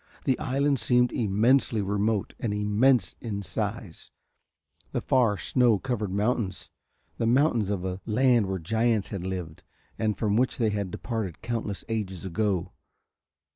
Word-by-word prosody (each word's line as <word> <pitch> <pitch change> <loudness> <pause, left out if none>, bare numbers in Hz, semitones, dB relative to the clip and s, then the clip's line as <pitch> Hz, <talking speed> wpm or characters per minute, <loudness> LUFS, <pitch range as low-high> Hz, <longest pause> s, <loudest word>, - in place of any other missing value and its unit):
The 130 -3 +1
island 140 -1 +1
seemed 125 0 +3
immensely 115 +3 +2
remote 105 +1 0
and 105 -3 -2
immense 105 +1 +2
in 100 -4 -4
size, 105 -3 -4 0.8
the - - -1
far 120 -6 +2
snow 120 -2 +3
covered 110 -4 -3
mountains 105 0 -1 0.5
the 115 - +1
mountains 120 -4 +3
of 95 -3 -2
a 95 +1 -4
land 120 -1 +3
where 95 0 -2
giants 110 +4 0
had 100 -4 -4
lived 90 -4 -5 0.4
and 105 -3 0
from 105 -1 +1
which 125 +1 +1
they 110 -3 +1
had 100 -2 -2
departed 110 -3 -4
countless 115 -4 -3
ages 100 -6 -3
ago. 95 -1 -1
110 Hz, 140 wpm, -27 LUFS, 100-120 Hz, 0.8 s, seemed